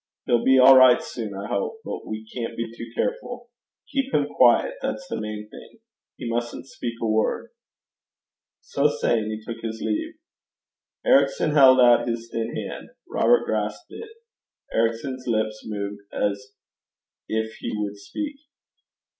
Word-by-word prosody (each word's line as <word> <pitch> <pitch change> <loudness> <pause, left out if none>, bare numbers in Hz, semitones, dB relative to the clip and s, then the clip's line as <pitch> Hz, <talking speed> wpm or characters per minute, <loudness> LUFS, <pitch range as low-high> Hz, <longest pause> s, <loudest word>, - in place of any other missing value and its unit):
He'll 120 -1 +2
be 130 0 +5
all 130 +1 +9
right 130 -1 +7
soon, 110 -5 -6
I 100 +1 -5
hope; 220 - -3
but - - -6
we 110 0 -6
can't 115 0 -5
be 115 -1 -4
too 115 0 -8
careful. 245 - -3 0.4
Keep 275 -1 0
him - - +3
quiet - - +4
that's 270 - -3
the - - -4
main 105 0 -5
thing. 110 - -14 0.4
He - - -6
mustn't 120 +1 -3
speak 120 -3 -6
a - - -2
word.' 110 0 0 1.1
So 140 +1 +1
saying 120 -6 0
he 110 0 -5
took 115 - -6
his 110 -1 -5
leave. 320 - -2 0.9
Ericson - - +3
held 135 -3 +7
out 120 -1 +6
his 115 0 -4
thin 115 0 -3
hand. - - -6 0.2
Robert 485 - +3
grasped - - -3
it. 455 - -9 0.6
Ericson's 115 +3 -1
lips 110 -1 -1
moved 100 -1 -4
as 105 +6 -2 0.8
if 110 0 -2
he - - -4
would 105 -1 -3
speak. 290 - -6
115 Hz, 150 wpm, -24 LUFS, 110-135 Hz, 1.1 s, all